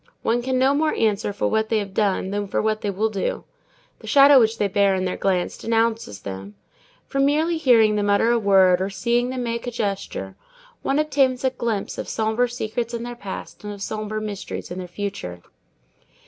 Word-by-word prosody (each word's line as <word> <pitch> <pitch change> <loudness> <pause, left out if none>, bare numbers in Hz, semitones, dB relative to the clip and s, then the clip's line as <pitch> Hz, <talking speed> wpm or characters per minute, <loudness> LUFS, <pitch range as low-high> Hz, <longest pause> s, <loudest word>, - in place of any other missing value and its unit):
One 235 +2 +1
can 260 +1 -1
no 265 +2 +4
more 305 +2 +1
answer 210 -2 +1
for 200 - -1
what 220 0 0
they 225 - +2
have 200 -2 -3
done 195 -2 0
than 205 0 -2
for - - -1
what 215 0 0
they 205 - -2
will 215 +3 0
do. 195 -2 -2 0.6
The - - -12
shadow 280 -1 +7
which 225 -1 +2
they 205 - +1
bear 200 0 +2
in 185 0 -1
their 180 - -2
glance 185 -2 -1
denounces 225 - -1
them. 100 +1 -7 0.5
From 275 0 0
merely 315 +4 +2
hearing 225 -7 +4
them 205 0 0
utter 205 +3 +3
a 240 - +3
word 190 -3 +4
or 190 - -1
seeing 235 +5 0
them 255 -1 -3
make 235 0 -3
a - - -2
gesture, 200 -4 -4 0.5
one 275 - 0
obtains 275 -4 +1
a 260 - +2
glimpse 230 -5 -3
of - - -5
sombre 220 +2 0
secrets 235 0 -3
in 235 - -4
their 240 0 -5
past 200 -3 -8
and 210 - -5
of 200 -1 -7
sombre 215 0 -3
mysteries 210 -4 -6
in 180 - -5
their 180 - -6
future. 175 - -6
220 Hz, 205 wpm, -23 LUFS, 200-245 Hz, 0.6 s, shadow